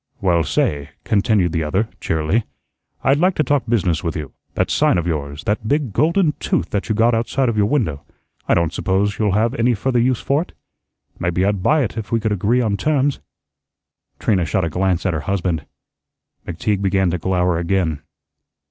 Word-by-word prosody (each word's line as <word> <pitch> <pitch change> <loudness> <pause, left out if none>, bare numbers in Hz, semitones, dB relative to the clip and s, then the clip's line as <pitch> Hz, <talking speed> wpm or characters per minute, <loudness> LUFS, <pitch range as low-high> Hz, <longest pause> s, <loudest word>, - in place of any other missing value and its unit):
"Well, 85 -4 +2
say," 70 -3 -1
continued 100 -4 +2
the 80 - -1
other, 95 +8 0
cheerily, 80 +8 0 0.6
"I'd 135 +2 +3
like 185 +2 +3
to 155 - +2
talk 145 -1 0
business 90 -9 +1
with 85 +1 -2
you. 75 -4 -6 0.2
That - - 0
sign - - +3
of 85 - -1
yours, 75 -3 -3
that 105 +1 -1
big 140 -5 0
golden 165 - +2
tooth 85 - -1
that 100 +2 -2
you 110 - +1
got 115 +2 +3
outside 120 +3 0
of 115 - -1
your 105 -1 +2
window, 90 - 0 0.5
I - - +3
don't 85 -1 +1
suppose 100 +4 0
you'll 105 -3 +1
have 110 +4 +2
any 120 -2 +2
further 125 +4 0
use 125 0 +2
for 140 +3 +1
it. 175 - -9 0.7
Maybe 90 +2 0
I'd 100 -1 0
buy 150 +9 +3
it 115 -1 -4
if 105 -3 -8
we 115 - +2
could 110 -1 -1
agree 105 +5 +1
on 105 -4 0
terms." 145 +3 +1 1.0
Trina 95 -5 +1
shot 90 +2 0
a - - -2
glance 90 +2 0
at 95 - +1
her 80 - -1
husband. 90 -5 -1 0.8
McTeague 95 +4 -1
began 95 -2 +2
to 90 - -2
glower 90 -1 +1
again. 85 -4 0
100 Hz, 190 wpm, -20 LUFS, 85-120 Hz, 1.0 s, I'd